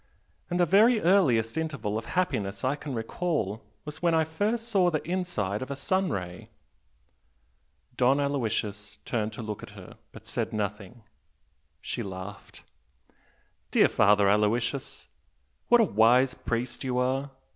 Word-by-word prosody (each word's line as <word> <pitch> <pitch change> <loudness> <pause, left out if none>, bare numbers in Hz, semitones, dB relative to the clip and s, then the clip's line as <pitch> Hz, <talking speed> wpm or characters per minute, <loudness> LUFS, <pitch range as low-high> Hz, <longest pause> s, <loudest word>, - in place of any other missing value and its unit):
And 175 0 -1
the 175 - +5
very 215 +7 +5
earliest 150 - +3
'interval' 140 -10 -2
of 115 - -4
happiness 100 - -1
I 130 +2 +1
can 145 -3 -6
recall 115 - -2 0.2
was 150 0 -8
when 170 -2 +3
I 160 - +4
first 210 +9 -2
saw 195 -6 +3
the 155 -3 -2
inside 170 - -2
of 130 - -5
a 140 - -3
sun 185 +6 0
ray!" 90 - -5 1.5
Don 130 +3 +4
Aloysius 110 -7 -2
turned 110 -3 -1
to 115 - -7
look 105 -1 -5
at - - -11
her, - - -12
but - - -13
said - - -3
nothing. 105 +2 -4 0.8
She - - -4
laughed. 95 +1 -8 1.1
"Dear - - +4
Father 100 0 +4
Aloysius, 115 +6 0 0.6
what 240 - +6
a - - +6
wise 125 - +4
priest 120 +2 -4
you 125 -1 -1
are! 130 +2 0
125 Hz, 145 wpm, -27 LUFS, 105-165 Hz, 1.5 s, what